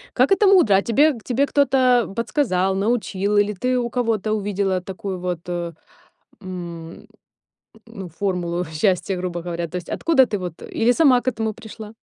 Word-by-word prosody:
Как - - +3
это 390 +1 +4
мудро! 360 - +5
А 195 - +2
тебе 290 +7 +3
к 225 - -12
тебе 265 +3 0
кто-то, 260 -4 +3
а, - - -5
подсказал, 195 -5 0
научил 205 -1 -1
или 205 0 +3
ты 250 +6 -1
у 240 -1 -2
кого-то 225 -4 -1
увидела 200 -3 -1
такую, 190 0 -6
вот, 180 -2 -3
э, 175 -1 -4 0.7
м, 170 -3 -8 0.8
ну, 195 -5 -9
формулу 175 0 -2
счастья, 180 +4 0
грубо 175 -1 -4
говоря? 170 -1 -4
То 180 - -6
есть, 180 - -6
откуда 285 -6 +3
ты, 205 - -3
вот, 180 -3 -7
э? - - -10
Или 235 +2 +2
сама 260 -4 +4
к 255 - -4
этому 220 -2 -1
пришла? 220 -1 -11
205 Hz, 180 wpm, -21 LUFS, 180-245 Hz, 0.8 s, мудро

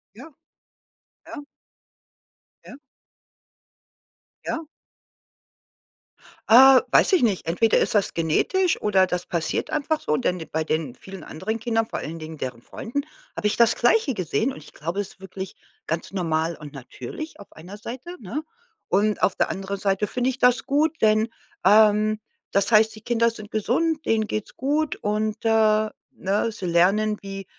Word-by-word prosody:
Ja, 325 - -11 1.0
ja. 290 - -8 1.2
Ja. 255 - -11 1.7
Ja. 325 0 -3 1.9
Äh, 260 +2 +9
weiß - - +4
ich 370 - +5
nicht, 215 -6 +1
entweder 195 +7 +2
ist - - +1
das 205 -2 +1
genetisch 320 - +1
oder 195 -3 +3
das 180 -1 -3
passiert 165 -3 0
einfach 310 +1 -1
so, 150 - 0
denn 180 0 -1
de 160 - -8
bei 160 0 0
den 155 -5 -2
vielen 190 +3 -11
anderen 220 +8 -4
Kindern, 225 -1 0
vor - - -5
allen 165 +2 -6
Dingen 155 -1 -9
deren 125 -2 -5
Freunden, 280 +5 -4 0.3
habe - - -4
ich 210 - +2
das 235 0 +4
Gleiche 370 - +2
gesehen 185 - -1
und 270 - -10
ich - - -14
glaube, 170 +6 -4
es 205 - -3
ist - - -18
wirklich 190 0 -8 0.3
ganz 165 +3 -3
normal 165 -3 -1
und 150 -1 -10
natürlich 145 - -8
auf 200 - -14
einer 180 +6 -11
Seite, 255 +11 -8
ne? 235 +7 -4 0.5
Und 210 +3 +1
auf 195 - +2
der - - 0
anderen 195 +1 -4
Seite 195 +1 0
finde 250 +3 0
ich 260 - -10
das 250 -1 +3
gut, 300 +3 +1
denn, 215 +1 +3 0.3
ähm, 215 +2 +5 0.3
das 200 +3 +2
heißt, 220 0 +5
die 215 - -12
Kinder 230 +1 +2
sind 215 -2 -10
gesund, 300 +9 0
denen 220 -1 +2
geht's 215 0 -5
gut 295 +3 0
und, 215 +1 -1
äh, 215 -1 +3 0.2
ne? 200 +4 -1
Sie 210 -4 -7
lernen, 195 +5 +2
wie 195 0 -7
215 Hz, 160 wpm, -24 LUFS, 185-240 Hz, 1.9 s, Äh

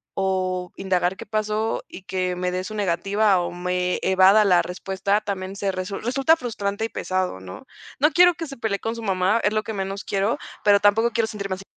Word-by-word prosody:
o 185 -2 -1
indagar 185 -1 0
qué - - -8
pasó 215 +1 -1
y 190 - -11
que 185 -1 -2
me 180 0 -2
dé 185 0 -2
su 215 +3 -7
negativa 200 +1 +2
o 175 - -3
me 180 0 -1
evada 190 +3 +5
la 180 -3 +5
respuesta 195 +3 -1
también 195 -2 -5
se 200 0 -1
resu 185 +1 -4
resulta 270 +6 +2
frustrante 215 -5 -3
y 225 - -4
pesado, 185 - -2
¿no? 95 +1 -10 0.3
No 300 +3 +4
quiero 355 0 +6
que 330 0 -5
se 275 - -8
pelee 220 -3 -1
con 225 +1 -3
su 230 - -7
mamá, 190 +2 +1
es 205 - +2
lo 215 - 0
que 220 - -5
menos 195 0 -4
quiero, 200 +3 0 0.3
pero 205 -1 +5
tampoco 210 +3 +3
quiero 230 0 +1
sentirme 200 -3 -4
así. 190 - -11
195 Hz, 210 wpm, -23 LUFS, 185-215 Hz, 0.3 s, quiero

